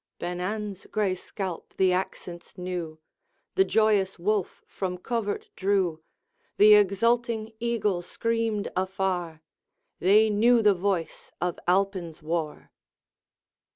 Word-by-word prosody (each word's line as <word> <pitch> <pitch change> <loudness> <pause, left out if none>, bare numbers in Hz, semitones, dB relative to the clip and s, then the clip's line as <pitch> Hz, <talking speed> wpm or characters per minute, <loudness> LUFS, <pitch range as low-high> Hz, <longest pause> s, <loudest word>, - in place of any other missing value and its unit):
Ben 175 +1 -4
an's 205 0 -4
gray 210 -3 0
scalp 185 -1 -6
the 185 -1 +4
accents 180 -1 -5
knew, 180 -3 -4 0.6
The 385 - +4
joyous 210 - +2
wolf 200 +2 -1
from 185 -2 -4
covert 205 +1 -3
drew, 185 -5 0 0.6
The 210 +1 +8
exulting 220 +3 +2
eagle 220 -6 0
screamed 230 +2 -1
afar, 185 -4 -2 0.6
They 210 +4 +5
knew 230 +3 +4
the 210 -1 +6
voice 185 -3 -2
of 175 -1 -2
Alpine's 180 -4 0
war. 160 -1 -3
195 Hz, 110 wpm, -27 LUFS, 180-215 Hz, 0.6 s, The